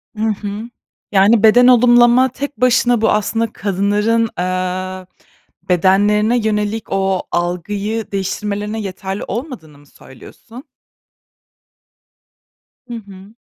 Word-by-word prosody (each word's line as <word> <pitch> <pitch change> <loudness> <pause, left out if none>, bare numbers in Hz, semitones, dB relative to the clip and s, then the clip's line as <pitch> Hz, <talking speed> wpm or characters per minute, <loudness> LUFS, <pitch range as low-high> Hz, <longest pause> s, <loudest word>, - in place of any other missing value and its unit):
Hı 215 - -4
hı. 210 +1 -4 0.4
Yani 205 +3 +4
beden 245 +3 +6
olumlama 240 +1 +5
tek 275 -1 -7
başına 245 -2 +3
bu, 225 - +2
aslında, 225 +1 -1
kadınların, 210 +3 0
eee, 185 +1 -3 0.6
bedenlerine 205 +6 +2
yönelik 215 -1 -1
o 195 -1 0
algıyı 200 +6 -3
değiştirmelerine 205 +2 -3
yeterli 195 0 -6
olmadığını 220 - -7
mı 145 - -20
söylüyorsun? 185 - -15 2.2
Hı 240 - -8
hı. 200 -2 -11
210 Hz, 100 wpm, -17 LUFS, 190-230 Hz, 2.2 s, beden